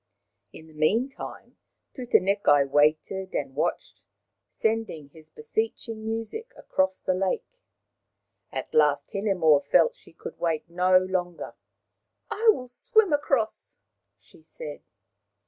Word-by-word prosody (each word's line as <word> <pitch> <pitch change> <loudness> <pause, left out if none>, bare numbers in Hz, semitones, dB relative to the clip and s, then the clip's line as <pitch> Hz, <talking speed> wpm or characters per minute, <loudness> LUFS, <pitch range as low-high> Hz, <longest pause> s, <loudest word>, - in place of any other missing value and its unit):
In 160 - -12
the 160 - -17
meantime 225 - -2 0.4
Tutanekai 200 - +3
waited 155 +6 +1
and 135 -2 -2
watched, - - -3 0.6
sending 220 -10 -1
his 155 +1 -17
beseeching 220 +8 -3
music 225 - -4
across 190 0 0
the 185 - 0
lake. 190 - -2 0.9
At - - -5
last 465 - +3
Hinemoa 180 -8 +3
felt 485 - +4
that - - -20
she - - -15
could - - -9
wait 165 -2 -1
no 180 +2 +4
longer. 185 -2 -2 0.4
" - - -35
I 450 +1 +3
will 255 -11 -5
swim 410 - +2
across! 230 -7 -1 0.2
" 100 - -55
she 95 - -20
said. 155 -2 -9
190 Hz, 125 wpm, -26 LUFS, 160-230 Hz, 0.9 s, felt